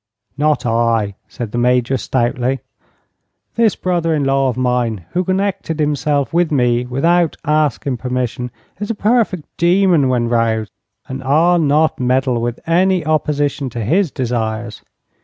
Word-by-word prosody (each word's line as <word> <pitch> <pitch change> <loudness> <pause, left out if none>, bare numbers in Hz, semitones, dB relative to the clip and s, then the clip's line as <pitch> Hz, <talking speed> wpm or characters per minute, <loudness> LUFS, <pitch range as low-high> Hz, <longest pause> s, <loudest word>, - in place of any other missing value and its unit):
"Not 150 -1 +1
I," 115 -3 +1
said 115 -4 -6
the 120 - -2
Major, 125 +1 +2
stoutly. 125 +1 -1 0.9
"This 230 -3 +2
brother 170 -3 0
in 145 - 0
law 135 0 +2
of 125 - -4
mine, 125 -7 -1
who 180 - 0
connected 190 -3 -2
himself 145 0 0
with 170 -1 +2
me 125 -3 +1
without 165 +6 +1
asking 150 -3 0
permission, 125 0 -3 0.3
is 205 - -4
a 230 - -1
perfect 210 -6 +1
demon 175 -5 +3
when 120 -2 +1
'roused, 115 -2 0 0.4
and 130 0 -6
I'll 165 +6 +3
not 155 +1 +2
meddle 125 -1 +1
with 120 0 -3
any 180 0 +2
opposition 145 -3 0
to 120 -1 -5
his 170 - +2
desires. 115 -4 -3
135 Hz, 140 wpm, -17 LUFS, 120-165 Hz, 0.9 s, demon